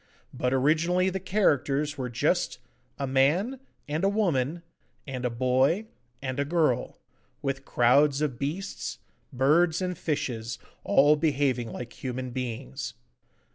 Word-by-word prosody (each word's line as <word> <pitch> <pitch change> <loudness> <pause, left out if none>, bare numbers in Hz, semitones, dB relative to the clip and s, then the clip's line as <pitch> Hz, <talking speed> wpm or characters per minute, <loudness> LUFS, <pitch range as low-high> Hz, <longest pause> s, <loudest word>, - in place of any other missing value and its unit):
But 125 -1 -1
originally 165 +7 +2
the 190 - -2
characters 150 -7 +1
were 130 -2 -3
just 120 - 0 0.4
'a 140 - -2
man,' 150 - +2 0.3
and 155 +4 -2
'a 195 - +4
woman,' 170 -6 0 0.4
and 130 -3 -5
'a - - +2
boy,' 130 - +2 0.4
and 130 0 -3
'a - - +3
girl,' 155 -5 +1 0.5
with 135 0 -2
crowds 140 +4 +4
of 145 -6 -1
beasts, 150 - -4 0.3
birds, 155 +6 +3
and 180 -1 -2
fishes, 115 -8 -3 0.3
all 145 +2 +5
behaving 140 -6 +1
like 120 +2 -7
human 130 0 -4
beings. 120 - -5
140 Hz, 130 wpm, -27 LUFS, 130-165 Hz, 0.5 s, all